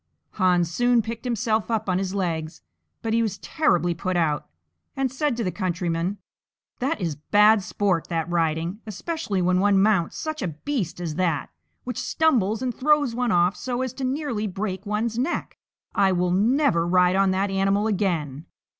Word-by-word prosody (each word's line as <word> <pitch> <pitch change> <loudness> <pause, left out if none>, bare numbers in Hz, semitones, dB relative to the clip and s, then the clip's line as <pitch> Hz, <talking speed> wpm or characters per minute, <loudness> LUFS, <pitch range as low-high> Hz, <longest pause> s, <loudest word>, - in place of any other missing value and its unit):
Hans 180 -3 +2
soon 245 +4 +3
picked 230 +2 -6
himself 225 -2 0
up 220 -2 -1
on 180 -1 +1
his 190 0 -3
legs, 165 -4 -3 0.4
but 225 -1 -1
he 230 - +3
was 215 -3 -1
terribly 175 - +1
put 185 +2 -2
out, 155 -3 0 0.5
and 270 -2 0
said 270 -2 -1
to 235 - -1
the 180 - -1
countryman, 175 0 -2 0.6
"That 275 +3 -1
is 165 -6 -2
bad 210 +7 +4
sport, 185 -3 -1
that 165 -2 -2
riding, 170 +2 -1
especially 215 - -3
when 180 +1 +2
one 200 0 +4
mounts 195 -4 +2
such 310 -2 -4
a - - -1
beast 175 - -3
as 170 -3 -3
that, 170 -6 0 0.3
which 250 -2 -4
stumbles 235 -8 +1
and 250 -1 -1
throws 290 -2 +2
one 245 0 0
off 175 +1 +3
so 250 0 -3
as 260 - -4
to 270 - -6
nearly 255 -5 -1
break 195 0 -4
one's 225 +2 -1
neck. 280 +8 -2 0.3
I 195 -2 +3
will 180 0 +1
never 205 - +2
ride 180 +1 +4
on 195 0 +3
that 190 +1 0
animal 195 +2 +1
again. 170 -9 -1
195 Hz, 175 wpm, -24 LUFS, 175-235 Hz, 0.6 s, bad